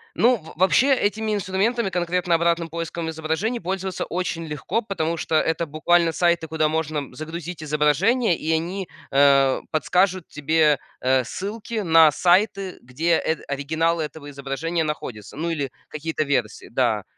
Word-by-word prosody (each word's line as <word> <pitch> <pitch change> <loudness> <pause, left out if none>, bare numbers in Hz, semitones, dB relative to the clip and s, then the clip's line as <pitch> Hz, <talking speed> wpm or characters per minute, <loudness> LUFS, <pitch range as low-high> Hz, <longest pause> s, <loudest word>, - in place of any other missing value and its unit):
ну, 245 +2 +4
в 160 -5 -12
вообще 255 +9 +4
этими 215 -1 -1
инструментами, 200 +4 0
конкретно 175 0 0
обратным 170 0 +1
поиском 165 0 -4
изображений, 160 +9 -2
пользоваться 190 +1 -3
очень 175 -2 -3
легко, 150 - -2
потому 170 -5 -2
что 160 -1 -1
это 165 +1 +1
буквально 165 +2 +2
сайты, 170 -1 +1
куда 155 -1 +1
можно 155 -4 -3
загрузить 160 +3 -6
изображения, 160 - +2
и 160 +1 -2
они, 175 +4 -2 0.2
э, 140 -1 +4
подскажут 180 +3 +1
тебе, 150 0 +2 0.2
э, 130 0 +2
ссылки 215 - -4
на 160 -2 +7
сайты, 190 +2 +2
где, 160 +7 +1
эт 160 - -1
оригиналы 160 +4 0
этого 150 -1 -7
изображения 145 +4 -2
находится. 120 -8 -6
Ну, 170 +2 -2
или 145 -5 -2 0.2
какие-то 155 0 -3
версии, 130 -6 -2
да. - - 0
165 Hz, 145 wpm, -23 LUFS, 150-185 Hz, 0.2 s, на